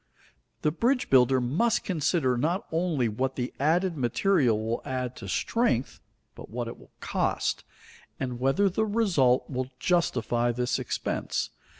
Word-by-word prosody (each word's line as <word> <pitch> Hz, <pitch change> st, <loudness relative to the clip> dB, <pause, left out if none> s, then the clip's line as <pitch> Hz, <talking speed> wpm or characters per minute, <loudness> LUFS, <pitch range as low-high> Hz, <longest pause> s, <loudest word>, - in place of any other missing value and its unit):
The 150 Hz, -, +3 dB
bridge 245 Hz, -, 0 dB
builder 130 Hz, 0 st, +5 dB
must 155 Hz, -, +1 dB
consider 155 Hz, -6 st, +1 dB
not 165 Hz, -, 0 dB
only 160 Hz, -7 st, +1 dB
what 130 Hz, +5 st, -2 dB
the 125 Hz, -1 st, -3 dB
added 170 Hz, +5 st, +2 dB
material 130 Hz, -, +2 dB
will 115 Hz, +2 st, -2 dB
add 130 Hz, -1 st, -3 dB
to 95 Hz, -, -8 dB
strength, 135 Hz, -, 0 dB, 0.3 s
but -, -, -11 dB
what 120 Hz, +1 st, -4 dB
it 115 Hz, -, -8 dB
will -, -, -17 dB
cost, -, -, -1 dB, 0.6 s
and 125 Hz, -2 st, -3 dB
whether 135 Hz, +11 st, +2 dB
the 220 Hz, +4 st, 0 dB
result 170 Hz, -, +2 dB
will 130 Hz, -1 st, -3 dB
justify 125 Hz, -7 st, +1 dB
this 125 Hz, +1 st, -1 dB
expense. -, -, -2 dB
130 Hz, 140 wpm, -27 LUFS, 125-180 Hz, 0.6 s, builder